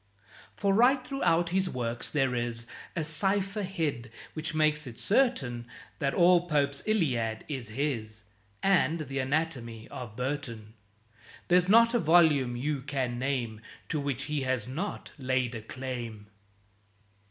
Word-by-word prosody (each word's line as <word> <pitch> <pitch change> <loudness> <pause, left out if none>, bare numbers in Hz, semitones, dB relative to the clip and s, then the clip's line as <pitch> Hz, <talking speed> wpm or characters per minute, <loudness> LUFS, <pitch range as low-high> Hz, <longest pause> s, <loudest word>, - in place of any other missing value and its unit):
For 200 -1 +1
right 250 +4 +4
throughout 175 -11 +1
his 190 +1 +1
works 120 -3 -3
there 135 -4 +1
is 120 -1 -2 0.3
A 165 - 0
cipher 195 +6 0
hid, 160 - -2 0.2
which 155 0 -3
makes 155 -1 +2
it 115 - -9
certain 130 - +1 0.3
That 140 -1 0
all 175 0 +5
Pope's 140 -2 +1
"Iliad" 125 - 0
is 130 -7 -5
his, 110 -4 -3 0.4
And 175 -4 +3
the 135 -2 -3
"Anatomy" 130 -5 -2
of 115 -4 -7
Burton; 120 -4 -4 0.8
There's 180 +1 +4
not 230 +2 +6
a 240 - +3
volume 155 - +4
you 140 +3 -1
can 130 -3 -2
name 125 -5 -2 0.3
To 155 - 0
which 140 -2 -2
he 150 0 -2
has 130 -2 -1
not 175 +10 -4
laid 130 -2 0
a 115 - -5
claim. 120 -3 -6
140 Hz, 140 wpm, -29 LUFS, 120-170 Hz, 0.8 s, not